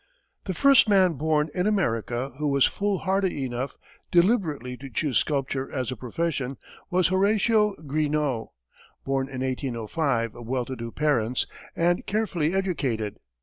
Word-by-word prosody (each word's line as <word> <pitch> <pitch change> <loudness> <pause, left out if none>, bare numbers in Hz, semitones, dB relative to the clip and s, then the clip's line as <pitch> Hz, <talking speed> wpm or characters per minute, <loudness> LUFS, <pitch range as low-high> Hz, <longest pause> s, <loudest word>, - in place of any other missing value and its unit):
The 185 - -3
first 275 -2 +6
man 190 -4 +5
born 155 +1 +1
in 180 +2 0
America 125 - 0
who 150 - 0
was 140 -2 +4
foolhardy 195 -6 0
enough 125 +2 -4 0.3
deliberately 170 - +2
to 135 +2 -9
choose 130 +2 +1
sculpture 135 -2 -1
as 130 -3 -2
a - - -3
profession 135 +1 -3 0.3
was 180 0 +3
Horatio 210 +2 +3
Greenough, 145 -4 0 0.6
born 135 -1 0
in 130 -1 -6
1805, 130 -1 -1
of 120 -1 -10
well 125 0 -1
to 130 - -5
do 115 -1 -6
parents, 125 -5 +1 0.3
and 175 +1 +2
carefully 190 -6 0
educated. 130 - -1
145 Hz, 140 wpm, -26 LUFS, 125-185 Hz, 0.6 s, first